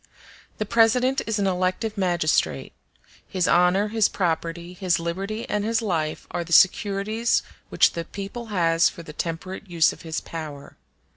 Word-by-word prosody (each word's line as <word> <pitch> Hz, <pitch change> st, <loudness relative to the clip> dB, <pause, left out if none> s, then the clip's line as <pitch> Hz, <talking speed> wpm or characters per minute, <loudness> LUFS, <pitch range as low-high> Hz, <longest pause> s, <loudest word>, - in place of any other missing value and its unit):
The 215 Hz, -, -2 dB
President 240 Hz, +5 st, +3 dB
is 220 Hz, -1 st, 0 dB
an 200 Hz, -, 0 dB
elective 185 Hz, +4 st, -1 dB
magistrate. 175 Hz, -5 st, 0 dB, 0.5 s
His 185 Hz, -2 st, 0 dB
honor, 180 Hz, +4 st, +3 dB
his 220 Hz, -1 st, +2 dB
property, 170 Hz, -1 st, -2 dB
his 180 Hz, -2 st, 0 dB
liberty, 195 Hz, +6 st, -4 dB
and 210 Hz, -1 st, -1 dB
his 225 Hz, +1 st, +1 dB
life 165 Hz, -8 st, -2 dB
are 175 Hz, -, -2 dB
the 170 Hz, -, -12 dB
securities 200 Hz, +5 st, +3 dB, 0.3 s
which -, -, +4 dB
the 170 Hz, -, -4 dB
people 200 Hz, +6 st, -7 dB
has 165 Hz, -5 st, +3 dB
for 170 Hz, -, -11 dB
the 155 Hz, -, -10 dB
temperate 180 Hz, +5 st, -5 dB
use 170 Hz, -2 st, +3 dB
of -, -, -14 dB
his 160 Hz, -1 st, -3 dB
power. 150 Hz, -4 st, -8 dB
185 Hz, 155 wpm, -24 LUFS, 170-210 Hz, 0.5 s, which